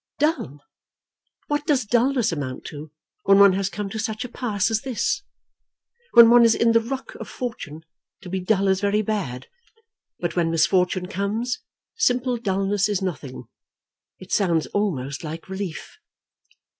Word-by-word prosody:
"Dull! 290 Hz, -, -1 dB, 0.8 s
What 295 Hz, +1 st, -2 dB
does 275 Hz, -6 st, +2 dB
dulness 245 Hz, +1 st, +2 dB
amount 140 Hz, -5 st, -5 dB
to 150 Hz, +1 st, -9 dB, 0.3 s
when 195 Hz, 0 st, +6 dB
one 200 Hz, -1 st, +7 dB
has 195 Hz, 0 st, -1 dB
come 205 Hz, 0 st, -4 dB
to 220 Hz, -, -4 dB
such 220 Hz, +2 st, -3 dB
a -, -, -7 dB
pass 225 Hz, -4 st, -1 dB
as 220 Hz, -1 st, +1 dB
this? 405 Hz, -, -1 dB, 0.9 s
When 235 Hz, -1 st, +9 dB
one 240 Hz, 0 st, +7 dB
is 230 Hz, -1 st, +5 dB
in 230 Hz, 0 st, +3 dB
the 230 Hz, -, +5 dB
ruck 265 Hz, +4 st, -6 dB
of -, -, -8 dB
fortune, 190 Hz, -, -6 dB, 0.4 s
to -, -, -11 dB
be 190 Hz, +1 st, -2 dB
dull 195 Hz, +1 st, +1 dB
is 190 Hz, 0 st, +2 dB
very 205 Hz, +1 st, +1 dB
bad; 185 Hz, -, -3 dB, 0.7 s
but 175 Hz, -1 st, -3 dB
when 170 Hz, -2 st, +1 dB
misfortune 180 Hz, +2 st, +2 dB
comes, 210 Hz, +6 st, -2 dB, 0.4 s
simple 250 Hz, -, +1 dB
dulness 195 Hz, -2 st, 0 dB
is 200 Hz, -2 st, -1 dB
nothing. 145 Hz, -9 st, -5 dB, 0.7 s
It 185 Hz, -, -13 dB
sounds 170 Hz, -6 st, +2 dB
almost 145 Hz, -10 st, -2 dB
like 160 Hz, +1 st, -7 dB
relief." 190 Hz, -3 st, -6 dB
200 Hz, 155 wpm, -23 LUFS, 180-235 Hz, 0.9 s, When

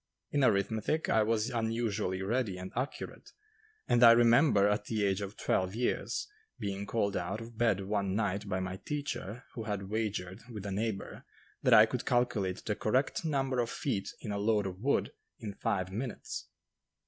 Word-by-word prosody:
In 145 Hz, -2 st, +2 dB
arithmetic 110 Hz, +7 st, +1 dB
I 110 Hz, -, +4 dB
was 110 Hz, +2 st, +1 dB
unusually 110 Hz, -5 st, -1 dB
ready 110 Hz, -2 st, 0 dB
and 95 Hz, +1 st, -7 dB
accurate, 125 Hz, +4 st, -5 dB, 0.5 s
and 120 Hz, 0 st, +4 dB
I 115 Hz, -1 st, +11 dB
remember, 115 Hz, -2 st, +5 dB
at 105 Hz, 0 st, 0 dB
the 110 Hz, -2 st, 0 dB
age 95 Hz, 0 st, +1 dB
of 100 Hz, +1 st, -6 dB
twelve 95 Hz, +2 st, 0 dB
years, 120 Hz, +1 st, -1 dB, 0.3 s
being 100 Hz, -1 st, -4 dB
called 100 Hz, -3 st, 0 dB
out 90 Hz, +4 st, -2 dB
of 115 Hz, 0 st, -9 dB
bed 110 Hz, -4 st, +2 dB
one 100 Hz, -1 st, -1 dB
night 100 Hz, -1 st, -1 dB
by 95 Hz, -1 st, 0 dB
my 95 Hz, 0 st, -4 dB
teacher 130 Hz, -5 st, -4 dB
who 115 Hz, -, -5 dB
had 100 Hz, -2 st, -3 dB
wagered 105 Hz, -4 st, -2 dB
with 105 Hz, -4 st, -7 dB
a 100 Hz, -, -3 dB
neighbor 105 Hz, 0 st, -3 dB, 0.4 s
that -, -, +6 dB
I -, -, +9 dB
could -, -, -4 dB
calculate 110 Hz, -7 st, +1 dB
the 105 Hz, -, 0 dB
correct 130 Hz, +11 st, 0 dB
number 135 Hz, -5 st, 0 dB
of 120 Hz, -1 st, +1 dB
feet 120 Hz, -9 st, -2 dB
in 105 Hz, -, -4 dB
a 100 Hz, -, -2 dB
load 105 Hz, -1 st, +2 dB
of 95 Hz, -1 st, -5 dB
wood 140 Hz, +6 st, +1 dB, 0.3 s
in 105 Hz, -3 st, -6 dB
five 95 Hz, -2 st, -1 dB
minutes. 115 Hz, +5 st, -5 dB
105 Hz, 175 wpm, -31 LUFS, 100-120 Hz, 0.5 s, I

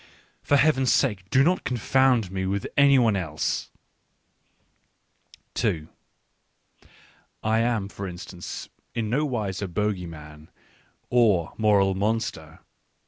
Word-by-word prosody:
For 145 Hz, -, +3 dB
Heaven's 135 Hz, -3 st, +3 dB
sake 105 Hz, -8 st, +1 dB
do 135 Hz, 0 st, +4 dB
not 180 Hz, +5 st, +2 dB
confound 125 Hz, -3 st, +2 dB
me 95 Hz, -1 st, -2 dB
with 100 Hz, +1 st, -2 dB
any 140 Hz, -1 st, +6 dB
one 115 Hz, -5 st, +3 dB
else 80 Hz, -6 st, -2 dB, 0.9 s
/ -, -, -31 dB
2 80 Hz, -2 st, -1 dB, 1.6 s
I 110 Hz, +1 st, +2 dB
am, 115 Hz, -4 st, 0 dB
for 100 Hz, 0 st, -7 dB
instance, 90 Hz, 0 st, -8 dB, 0.3 s
in 110 Hz, -2 st, -2 dB
no 145 Hz, +5 st, +1 dB
wise 105 Hz, -7 st, -3 dB
a 100 Hz, -, -2 dB
bogey 95 Hz, -1 st, -2 dB
man, 75 Hz, -1 st, -12 dB, 0.6 s
or 105 Hz, -9 st, +3 dB
moral 100 Hz, -3 st, +3 dB
monster. 110 Hz, +4 st, -3 dB
105 Hz, 120 wpm, -25 LUFS, 95-125 Hz, 1.6 s, any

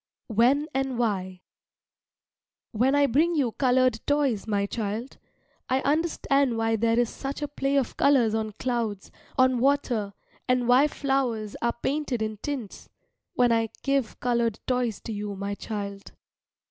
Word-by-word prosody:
WHEN 255 Hz, +7 st, +4 dB
AND 270 Hz, -1 st, -1 dB
WHY 190 Hz, -6 st, -1 dB, 1.3 s
When 255 Hz, +5 st, +2 dB
I 285 Hz, 0 st, +5 dB
bring 315 Hz, +7 st, +2 dB
you 270 Hz, -6 st, +1 dB
coloured 255 Hz, -2 st, +2 dB
toys, 280 Hz, -8 st, +1 dB
my 200 Hz, -2 st, +1 dB
child, 220 Hz, +4 st, -4 dB, 0.5 s
I 260 Hz, +1 st, +2 dB
understand 280 Hz, -4 st, +1 dB
why 225 Hz, 0 st, +1 dB
there 230 Hz, +1 st, +1 dB
is 240 Hz, 0 st, +3 dB
such 275 Hz, +5 st, -5 dB
a -, -, -1 dB
play 280 Hz, -1 st, -1 dB
of 270 Hz, -4 st, 0 dB
colours 250 Hz, -6 st, +4 dB
on 220 Hz, -1 st, -2 dB
clouds, 230 Hz, -4 st, -3 dB, 0.3 s
on 255 Hz, -1 st, +4 dB
water, 245 Hz, -6 st, +1 dB, 0.3 s
and 250 Hz, -1 st, +2 dB
why 255 Hz, +4 st, +6 dB
flowers 260 Hz, -8 st, -1 dB
are 235 Hz, 0 st, 0 dB
painted 275 Hz, -5 st, -1 dB
in 215 Hz, -1 st, -4 dB
tints 255 Hz, -3 st, -6 dB, 0.5 s
when 245 Hz, -1 st, +4 dB
I 225 Hz, -1 st, +2 dB
give 275 Hz, -5 st, 0 dB
coloured 235 Hz, -3 st, 0 dB
toys 250 Hz, -5 st, 0 dB
to 225 Hz, -, -5 dB
you, 205 Hz, -1 st, -4 dB
my 200 Hz, +1 st, -3 dB
child. 200 Hz, -1 st, -6 dB
240 Hz, 145 wpm, -26 LUFS, 220-275 Hz, 1.3 s, why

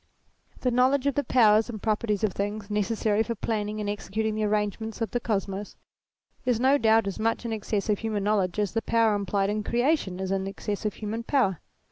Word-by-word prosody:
The 250 Hz, -, +1 dB
knowledge 255 Hz, +3 st, +3 dB
of 280 Hz, -, +2 dB
the 285 Hz, -, 0 dB
powers 220 Hz, -3 st, +4 dB
and 220 Hz, -3 st, -5 dB
properties 215 Hz, -1 st, 0 dB
of 210 Hz, -4 st, +1 dB
things 205 Hz, +1 st, -4 dB
necessary 210 Hz, 0 st, +1 dB
for 230 Hz, +1 st, -2 dB
planning 215 Hz, -1 st, -2 dB
and 210 Hz, -, -3 dB
executing 210 Hz, +1 st, -2 dB
the 215 Hz, 0 st, 0 dB
arrangements 210 Hz, +2 st, -1 dB
of 225 Hz, -, -2 dB
the 245 Hz, -, 0 dB
Kosmos, 200 Hz, -3 st, -3 dB, 0.7 s
is 245 Hz, -3 st, +1 dB
no 270 Hz, +3 st, +4 dB
doubt 225 Hz, -2 st, +4 dB
as 195 Hz, +1 st, -4 dB
much 225 Hz, +2 st, 0 dB
in 230 Hz, -, -2 dB
excess 210 Hz, -1 st, -2 dB
of 210 Hz, -2 st, +1 dB
human 215 Hz, -3 st, -2 dB
knowledge 200 Hz, -3 st, +1 dB
as 205 Hz, -3 st, 0 dB
the 225 Hz, -, 0 dB
power 230 Hz, -2 st, +2 dB
implied 200 Hz, 0 st, 0 dB
in 210 Hz, 0 st, -2 dB
creation 240 Hz, -, 0 dB
is 190 Hz, 0 st, -3 dB
in 195 Hz, 0 st, -1 dB
excess 205 Hz, +2 st, -4 dB
of 210 Hz, -, -1 dB
human 220 Hz, +2 st, -4 dB
power. 230 Hz, -, +1 dB
215 Hz, 205 wpm, -27 LUFS, 205-230 Hz, 0.7 s, powers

